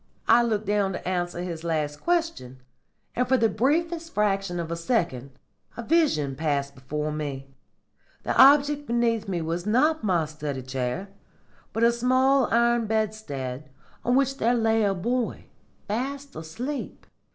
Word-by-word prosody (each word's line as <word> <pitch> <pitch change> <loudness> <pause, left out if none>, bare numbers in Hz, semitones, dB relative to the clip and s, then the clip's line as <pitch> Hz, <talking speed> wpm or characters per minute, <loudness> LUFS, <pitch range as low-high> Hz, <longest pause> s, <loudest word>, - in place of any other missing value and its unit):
I 240 - +6
looked 220 -3 0
down 200 -1 +1
to - - -6
answer 175 -1 -2
his 170 -3 -5
last 150 -3 -2
question, 325 - -1 0.5
and 250 +1 +1
for 260 - +3
the 225 - +3
briefest 330 - -1
fraction 195 -4 0
of 165 -1 -4
a - - -1
second 165 - -2 0.4
a 235 - -4
vision 225 - +2
passed 140 -2 -1
before 150 +3 -4
me. 140 -3 -5 0.7
The - - -1
object 290 +2 +5
beneath 230 -2 +1
me 175 -4 -2
was 170 +4 -3
not 300 +8 +2
my 175 -6 +2
study 150 -3 -5
chair, 130 +8 -3 0.6
but 225 - -1
a 235 - +6
small 255 +2 +3
iron 235 -1 +3
bedstead 155 -12 -3 0.3
on 245 - +2
which 270 0 +2
there 240 +2 +2
lay 225 -1 +2
a 200 -1 +1
boy, 240 +6 -2 0.4
fast 275 +6 -4
asleep. 240 - -6
210 Hz, 150 wpm, -25 LUFS, 155-250 Hz, 0.7 s, I